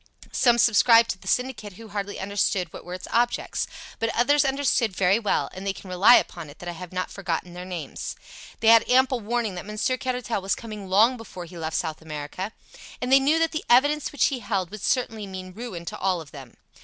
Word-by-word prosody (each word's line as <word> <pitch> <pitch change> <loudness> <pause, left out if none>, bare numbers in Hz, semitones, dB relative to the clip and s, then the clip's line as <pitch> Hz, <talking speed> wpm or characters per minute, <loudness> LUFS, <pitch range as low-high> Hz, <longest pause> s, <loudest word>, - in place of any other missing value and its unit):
Some 240 -3 +3
subscribed 230 +1 +5
to 190 - -7
the - - -14
syndicate 250 -5 -1
who 225 +4 -12
hardly 205 0 -4
understood 190 -3 -1
what - - -9
were 180 +1 -6
its 185 - -9
objects. 240 +1 0 0.3
But 230 - 0
others 285 +5 +4
understood 265 -7 +1
very 195 +3 +3
well, 210 - 0
and 185 - -8
they 195 -1 -1
can 190 -1 -11
rely 200 +7 +7
upon 165 -4 -1
it 145 - -13
that 175 - -10
I - - -2
have 175 +1 -9
not 185 0 -3
forgotten 180 -2 -3
their 180 +1 -7
names. 180 -4 -6 0.5
They 225 - +5
had 230 0 +6
ample 255 0 +4
warning 225 -1 -2
that 180 +1 -7
Monsieur 215 +4 -1
Caratal 250 -6 -2
was 195 +1 0
coming 210 -4 -8
long 225 +7 +4
before 190 -6 -9
he 175 - -13
left 160 -1 -3
South 160 -2 -3
America, 155 +6 -6 0.5
and 250 +1 -3
they 270 - +8
knew 290 +4 +3
that 330 0 +2
the 310 - -3
evidence 290 +4 +4
which 290 - +2
he 255 - -3
held 195 -7 -2
would 215 -1 -8
certainly 225 -5 -1
mean 185 -1 -8
ruin 200 -6 -7
to - - -5
all 185 -2 +1
of 155 -3 -11
them. 135 -4 -12
205 Hz, 220 wpm, -25 LUFS, 180-240 Hz, 0.5 s, they